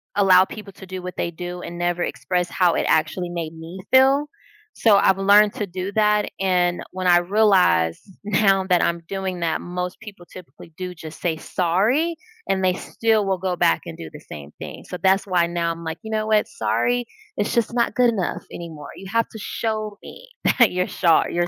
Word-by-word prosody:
allow 190 -2 +6
people 210 -1 -10
to 190 - -12
do 185 0 -7
what 180 0 -7
they 170 - -2
do 175 +1 -7
and 175 0 -7
never 175 0 -1
express 180 -1 -2
how 180 -3 +2
it - - 0
actually 170 +3 +1
made 165 -2 -5
me 165 +3 -9
feel. 270 +2 +5 0.5
So, 220 -3 +4
I've 190 -1 +4
learned 205 +2 +5
to 210 - -2
do 185 +1 -5
that, 210 -1 +2
and 180 -2 +1
when 185 0 -3
I 175 -1 +7
realized 180 - +3 0.2
now 195 -1 +2
that 180 -1 +4
I'm 170 0 0
doing 190 -1 -4
that, 165 -2 -1
most 180 0 -5
people 200 -6 -12
typically 180 -2 -13
do 185 -1 -5
just 160 -2 -10
say, 165 -2 -1
"Sorry," 210 - 0 0.3
and 190 -1 0
they 185 -1 +3
still 220 +2 0
will 190 -1 -1
go 185 -1 -1
back 80 - +2
and 80 -1 -8
do 80 - -8
the - - -9
same 75 -1 -11
thing. - - -8
So, 180 - -6
that's 190 +1 +3
why 180 -3 +2
now 170 -1 -1
I'm 165 0 -7
like, 160 0 -4
"You 220 - -7
know 215 0 -1
what, 215 -1 +2
sorry, 245 - 0 0.3
it's - - -1
just 235 0 +1
not 235 -3 0
good 245 0 +4
enough 195 -6 -3
anymore. 160 -4 -8
You 195 - -10
have 230 0 +1
to 220 - -10
show 215 -1 -3
me - - -12 0.3
that 235 - +6
you're 180 0 -1
shor 170 -4 +3
you're 175 0 0
185 Hz, 205 wpm, -22 LUFS, 175-210 Hz, 0.5 s, I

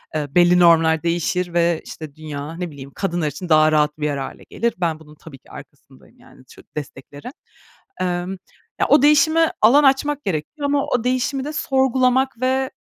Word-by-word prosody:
Eee, 150 -2 -2
belli 175 0 +5
normlar 165 -2 +4
değişir 175 +1 -1
ve, 170 -1 +1
işte, 155 -3 -10
dünya 155 0 -7
ne 175 -2 -5
bileyim, 140 -1 -11
kadınlar 175 -5 -2
için 150 +5 -7
daha 155 -1 +5
rahat 150 -1 +1
bir 150 - -2
yer 145 -1 -1
hâle 135 - -7
gelir. 235 0 -1
Ben, 165 -3 -2
bunun 150 -1 -16
tabii 145 -2 -14
ki - - -22
arkasındayım, 65 - -16
yani, - - -19
çok - - -19
desteklerim. 145 - -9 0.7
Emm, 180 +1 -2 0.4
ya - - +2
o 290 - +5
değişime 315 +3 +4
alan 265 +7 +6
açmak 285 +2 +1
gerekiyor 195 - -4
ama 285 0 0
o 245 -2 -1
değişimi 255 +2 -1
de 300 - -5
sorgulamak 265 -2 +1
ve 260 +1 0
175 Hz, 175 wpm, -20 LUFS, -, 0.7 s, alan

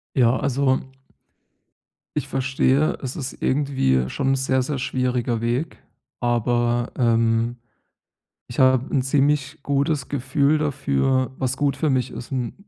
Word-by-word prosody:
Ja, 125 -1 +4
also 135 -1 +1 1.4
ich - - -1
verstehe. 135 +2 +1
Es 130 - -4
ist 135 -4 -6
irgendwie 130 - +1
schon 135 -1 -1
'n 135 - +3
sehr, 130 -1 +1
sehr 135 0 -3
schwieriger 125 -2 -1
Weg. 120 +7 -2 0.4
Aber, 120 0 0
ähm, 115 0 +2 0.9
ich 120 - -9
habe 130 -1 +4
'n 130 -3 +2
ziemlich 145 +2 +1
gutes 140 0 0
Gefühl 140 +2 +1
dafür, 130 - 0
was 130 -1 -2
gut 140 -2 +1
für 150 0 +1
mich 130 -1 0
ist 125 - -8
und 125 -3 -2
130 Hz, 135 wpm, -23 LUFS, 120-140 Hz, 1.4 s, Ja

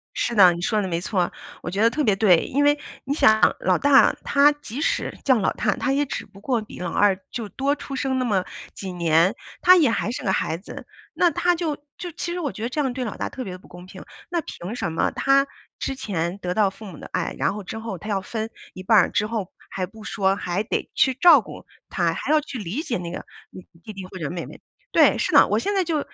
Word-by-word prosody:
是 - - -1
的， 185 -4 +7
你 170 - -6
说 215 +2 +1
的 195 - -2
没 170 -2 -1
错， 180 -1 -1 0.3
我 - - -5
觉 195 +4 -2
得 230 - +6
特 300 +6 -1
别 210 -7 +3
对。 195 -4 +5
因 285 +3 0
为 290 0 +3 0.2
你 275 - -2
想 220 -7 +4
老 185 -1 +2
大 285 -1 +5
他 285 +1 +5
即 290 -3 -7
使 - - -1
叫 260 -3 +4
老 195 - +1
大， - - 0
他 270 - -1
也 290 +1 +1
只 - - -5
不 195 - -17
过 240 0 0
比 215 - -11
老 175 -1 -3
二 200 -2 +3
就 230 -3 -4
多 275 +7 0
出 275 - -7
生 265 0 -1
那 255 - 0
么 200 -6 +1 0.3
几 190 -2 -6
年， 170 +3 +3 0.3
他 365 +1 +8
也 310 -8 +4
还 225 -1 -1
是 245 - -5
个 190 - +1
孩 165 - -1
子。 185 - -10 0.3
那 355 - +3
他 355 +4 +2
就 325 -3 -2 0.2
就 355 - -6
其 345 +1 -5
实 360 - -3
我 295 -6 -2
觉 215 - -8
得 235 - -1
这 300 +4 -1
样 265 -3 -1
对 255 0 -3
老 220 - -5
大 - - -3
特 260 - -6
别 185 -4 -7
不 185 - -19
公 180 +1 -12
平， 185 - -11 0.3
那 345 -2 -1
凭 205 - -7
什 170 - -3
么 160 - 0
他 275 0 +3 0.3
之 270 - -3
前 185 -8 -3
得 180 -3 -3
到 205 0 +3
父 215 +3 -13
母 185 -6 -9
的 - - -10
爱， 180 -2 -2
然 - - 0
后 210 0 -6
之 195 - -7
后 220 -4 -5
他 210 +6 -9
要 195 -2 0
分 220 +3 -4 0.2
一 185 - -9
半 220 +3 +4
儿 - - +2
之 210 - 0
后 215 -4 -4 0.2
还 185 - -3
不 220 +3 -14
说， 195 -2 0
还 190 0 -2
得 220 - -3
去 265 - +3
照 300 +1 +7
顾 200 - -11 0.2
他， 170 -3 0
还 275 - -3
要 310 - +5
去 280 -3 -7
理 210 - -4
解 300 -7 -2
那 175 -1 -6
个 - - -7 0.6
弟 215 - -8
弟 195 -2 -8
或 185 - -10
者 160 -5 -4
妹 175 -1 -5
妹。 - - -12 0.3
对， - - +5
是 - - 0
的， - - +7
我 - - +2
现 405 +1 -1
在 385 - +2
就 325 -3 -1
220 Hz, 280 characters per minute, -23 LUFS, 185-275 Hz, 0.6 s, 他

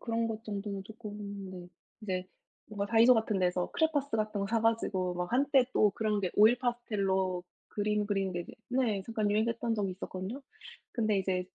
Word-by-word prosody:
그런 230 -1 -1
것 225 0 -4
정도는 200 -2 -4
쪼끔 215 -1 -9 0.4
네. 180 -1 -9 0.3
이제 185 -2 -2 0.4
뭔가 205 -2 -2
다이소 230 +3 +6
같은 220 -3 +1
데서 180 -1 +1
크레파스 290 -6 +1
같은 215 -1 -1
거 200 - 0
사 225 0 +1
가지고 195 -5 +1
막 180 +4 -3
한때 270 0 +4
또 210 - +4
그런 215 -1 0
게 185 - -1
오일 220 +4 +6
파스텔로 195 -7 0 0.2
그림 210 0 0
그리는 195 -2 0
게 175 - -2
이제 - - -9 0.2
네. 245 -6 +1
잠깐 215 -2 0
유행했던 230 +2 +1
적이 200 -2 0
있었거든요. 190 +8 -6 0.5
근데 215 -4 +1
이제 185 -1 0
210 Hz, 365 characters per minute, -31 LUFS, 190-230 Hz, 0.5 s, 다이소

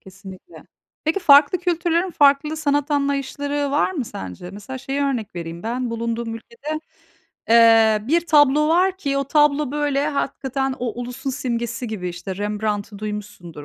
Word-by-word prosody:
Kesinlikle. 190 - -13 0.4
Peki, 320 +5 0
farklı 290 +1 +6
kültürlerin 345 0 0
farklı 290 0 +3
sanat 290 -1 0
anlayışları 285 0 -1
var 290 +5 +2
mı 285 -8 -3
sence? 95 - -8
Mesela 205 +7 -8
şeyi 270 +2 -3
örnek 255 -9 -2
vereyim 170 0 -6
ben: 245 +2 -3
bulunduğum 230 0 -3
ülkede, 310 - -6 0.7
eee, 225 -1 +6
bir 335 +3 +2
tablo 300 -1 +4
var 365 +3 +3
ki 280 -7 -2
o 275 - -1
tablo 295 0 +2
böyle 290 -1 0
hakikaten 270 -2 -2
o 245 -1 -4
ulusun 250 +3 -5
simgesi 235 -1 -3
gibi. 195 -5 -4
İşte, 180 +2 -6
Rembrandt'ı 205 0 -3
duymuşsundur, 205 -7 -7
270 Hz, 145 wpm, -21 LUFS, 220-295 Hz, 0.7 s, farklı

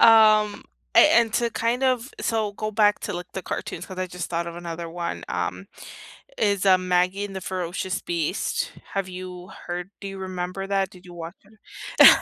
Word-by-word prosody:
Um, 215 -2 +6 0.3
a - - +9
and 230 -2 +6
to 235 -1 +2
kind 235 +3 0
of 255 +1 +1
so 220 -2 0
go 215 +1 -3
back 210 -1 +4
to, - - -3
like, 175 0 -6
the 190 - -4
cartoons - - -4
cause 185 - -9
I, 185 0 -2
just, 180 -2 -5
thought 170 0 -1
of 170 - -8
another 170 -1 -5
one, 170 - -4
um, 90 +1 -2 0.7
is, 200 -2 +1
uh, 185 -1 +8
Maggie 185 +2 +1
and 195 -1 -7
the 190 - -4
Ferocious 185 +1 -3
Beast. 170 +2 -1 0.2
Have 195 -1 -1
you 180 -1 -8 0.2
heard 180 +2 -4
do 200 - -5
you 195 0 -7
remember 185 0 -4
that? 195 -1 +1
Did 180 0 -16
you 175 - -11
watch 170 +1 -7 0.6
it? - - +13
185 Hz, 190 wpm, -25 LUFS, 175-205 Hz, 0.7 s, it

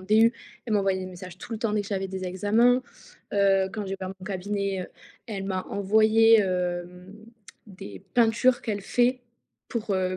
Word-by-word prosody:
DU. 220 +5 +4 0.3
Elle 230 - -3
m'envoyait 195 -2 +2
des 185 - -5
messages 185 -1 -9
tout 205 +6 -9
le 220 - -3
temps 215 -1 -1
dès 210 - +1
que 200 - -10
j'avais 195 -2 -2
des 190 0 -5
examens. 220 +7 +2 0.5
Heu, 195 -1 +3
quand 210 0 -5
j'ai 195 - -4
ouvert 185 - -4
mon 185 - -11
cabinet, 200 0 -2
heu, - - -7 0.4
elle 200 -5 -5
m'a 190 -1 -2
envoyé, 220 +3 +4
hem, 180 0 -3 0.5
des 105 - -10
peintures 240 +2 +3
qu'elle 205 -3 -3
fait 245 +5 +1 0.5
pour, 225 -3 -4
heu, 185 0 -1
200 Hz, 175 wpm, -26 LUFS, 185-220 Hz, 0.5 s, DU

